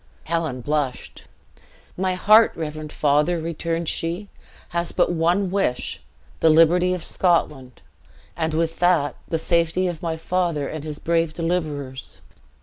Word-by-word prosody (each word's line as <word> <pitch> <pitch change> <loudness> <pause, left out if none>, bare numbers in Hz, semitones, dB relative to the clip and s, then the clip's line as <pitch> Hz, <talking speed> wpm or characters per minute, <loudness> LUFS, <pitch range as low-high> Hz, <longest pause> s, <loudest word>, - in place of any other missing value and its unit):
Helen 160 -6 -2
blushed. 145 -1 -3 0.7
"My 185 0 -1
heart, 215 +4 +6
reverend 155 -1 -5
father," 150 +4 +2
returned 165 +1 -3
she, 175 +7 -2 0.4
"has 170 0 -1
but - - +1
one 175 +3 +1
wish 195 -11 -1 0.4
the 165 - +4
liberty 175 +3 +4
of 180 - -6
Scotland; 150 -8 0 0.5
and, 160 -1 -2
with 165 0 -1
that, 170 -6 +2
the 165 - -1
safety 170 +2 +1
of 175 -3 -4
my 165 -2 -2
father 170 -4 -1
and 155 -2 -6
his 155 -1 -5
brave 165 -1 0
deliverers." 155 -6 -4
165 Hz, 135 wpm, -22 LUFS, 155-175 Hz, 0.7 s, heart